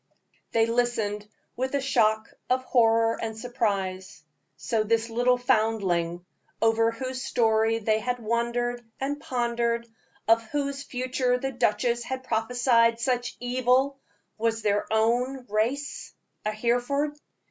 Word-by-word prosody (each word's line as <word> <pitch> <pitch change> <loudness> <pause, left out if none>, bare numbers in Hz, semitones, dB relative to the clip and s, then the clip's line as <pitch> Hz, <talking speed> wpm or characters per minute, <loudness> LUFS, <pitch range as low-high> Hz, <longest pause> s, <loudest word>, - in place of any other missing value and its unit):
They 225 -1 +3
listened 225 -3 -1 0.3
with 260 +2 -2
a - - +2
shock 220 -5 +1 0.2
of 255 +1 +2
horror 230 -2 +3
and 220 -1 -4
surprise. 200 -8 -2 0.3
So 220 -2 0
this 230 +1 0
little 245 +2 +3
foundling, 200 -8 +1 0.3
over 225 0 +3
whose 255 +3 -4
story 225 -1 +2
they 220 0 +1
had 245 +2 -2
wondered 235 +1 -1 0.2
and 285 +2 -2
pondered, 235 -1 -1 0.4
of 225 +1 +5
whose 280 +2 -2
future 255 -1 -1
the 270 +2 -3
duchess 235 0 +1
had 260 +2 -5
prophesied 230 0 +2
such 245 0 -1
evil, 255 +2 +1 0.4
was 225 0 +1
of 225 - -9
their 205 -1 +1
own 245 +4 +1
race, 240 +8 -2 0.3
a 215 - +1
Hereford. 245 +7 0
235 Hz, 125 wpm, -26 LUFS, 220-250 Hz, 0.4 s, of